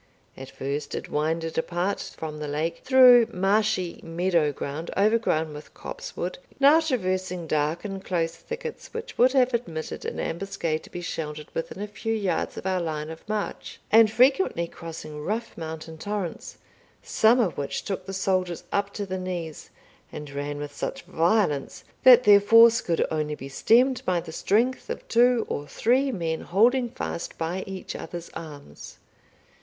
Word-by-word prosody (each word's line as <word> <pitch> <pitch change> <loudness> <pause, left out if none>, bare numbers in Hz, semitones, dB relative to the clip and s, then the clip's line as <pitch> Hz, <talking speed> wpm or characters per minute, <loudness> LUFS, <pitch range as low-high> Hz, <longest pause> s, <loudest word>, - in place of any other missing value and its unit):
At 135 0 -9
first 140 +2 -4
it - - -5
winded 160 +2 -1
apart 175 +4 -1 0.2
from 155 -1 -6
the 150 - -4
lake 155 +3 -2
through 255 -3 +7
marshy 195 -1 +1
meadow 165 -2 +1
ground, 145 +4 -5
overgrown 200 -7 +2
with 150 +1 -11
copsewood, - - -6 0.2
now 285 +3 +7
traversing 185 - -1
dark 155 +4 -1
and 195 -2 -5
close 165 -3 -1
thickets 470 -1 -8
which 460 +1 -6
would 255 +2 +5
have 255 -2 +3
admitted 165 -10 -4
an - - -4
ambuscade 170 -3 -2
to - - -14
be 175 - -6
sheltered 150 -3 -5
within 185 +4 -4
a - - -4
few 225 +2 -3
yards 200 -4 -1
of - - -7
our 185 -1 0
line 155 -1 -3
of 160 +6 -12
march, 210 -1 -4
and 225 0 +7
frequently 250 - +3
crossing 160 -3 -8
rough 225 +6 -3
mountain 160 -1 -7
torrents, 205 -3 -4 0.5
some 225 +3 +4
of 210 -8 +1
which 140 - -3
took 190 -1 -4
the - - -4
soldiers 185 -2 -1
up 200 0 0
to 205 - -3
the 185 -1 -4
knees, 175 -4 -5 0.4
and 150 -1 -8
ran 145 +1 -4
with 145 0 -7
such 270 - -4
violence, 165 -5 0 0.2
that 250 -1 +8
their 205 -3 +7
force 230 +2 +7
could 165 -2 0
only 150 -1 -1
be 135 - -8
stemmed 245 - +3
by 180 -2 +1
the 165 - -8
strength 235 +10 0
of - - -5
two 240 0 +4
or 145 - -4
three 260 - +1
men 165 -7 -2
holding 240 +7 +3
fast 175 - -5
by 170 +3 -2
each 190 -1 -6
other's 170 -1 -7
arms. 145 - -10
185 Hz, 165 wpm, -26 LUFS, 160-225 Hz, 0.5 s, that